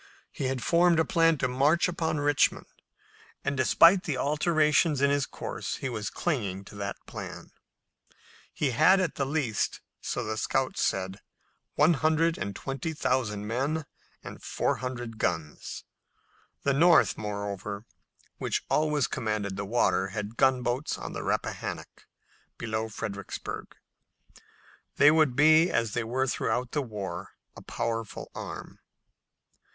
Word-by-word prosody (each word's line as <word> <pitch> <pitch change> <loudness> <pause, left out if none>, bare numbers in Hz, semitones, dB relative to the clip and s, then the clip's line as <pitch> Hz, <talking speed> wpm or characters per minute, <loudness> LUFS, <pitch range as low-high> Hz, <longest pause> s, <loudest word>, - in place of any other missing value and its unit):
He 135 - -4
had 130 -2 -2
formed 170 -1 +4
a 160 - +3
plan 165 -2 +3
to 130 - 0
march 140 +8 +3
upon 160 -3 -1
Richmond, 145 -1 +2 0.8
and, - - 0
despite 165 +8 +6
the 155 -7 -3
alterations 150 +1 +2
in 140 +1 +3
his 145 -1 +1
course, - - -5
he 135 - -4
was 105 -4 -3
clinging 100 - -2
to 105 - -12
that 100 0 -5
plan. - - -8 1.0
He 140 -4 0
had 155 +10 +5
at 180 -5 0
the 135 - -2
least, 135 -7 -1 0.2
so - - -2
the 110 0 -3
scouts 130 +3 0
said, 95 0 -1 0.6
one 155 +4 +5
hundred 160 +2 +2
and 100 +1 -4
twenty 135 +7 -4
thousand 120 -8 -1
men 140 +8 -1 0.4
and - - -9
four - - -1
hundred 120 -3 -5
guns. 80 -5 -3 0.8
The 140 - +2
North, 170 +5 +5
moreover, 100 0 -5 0.5
which - - -1
always 150 -3 +2
commanded 105 -3 -2
the 100 +1 -4
water, 100 -3 +2
had 105 +3 -5
gunboats 130 +1 +1
in - - -7
the - - -4
Rappahannock - - -4 0.5
below 110 -1 -3
Fredericksburg, 105 -2 -5 0.7
and - - -20 0.6
they 145 - +7
would 155 -5 +3
be, 155 +4 +6
as 115 -3 0
they 120 - 0
were 125 +4 0
throughout 120 -1 -1
the 150 - 0
war, 105 -7 -6 0.2
a - - -10
powerful 115 -2 -4
arm. - - -8
130 Hz, 140 wpm, -28 LUFS, 110-155 Hz, 1.0 s, they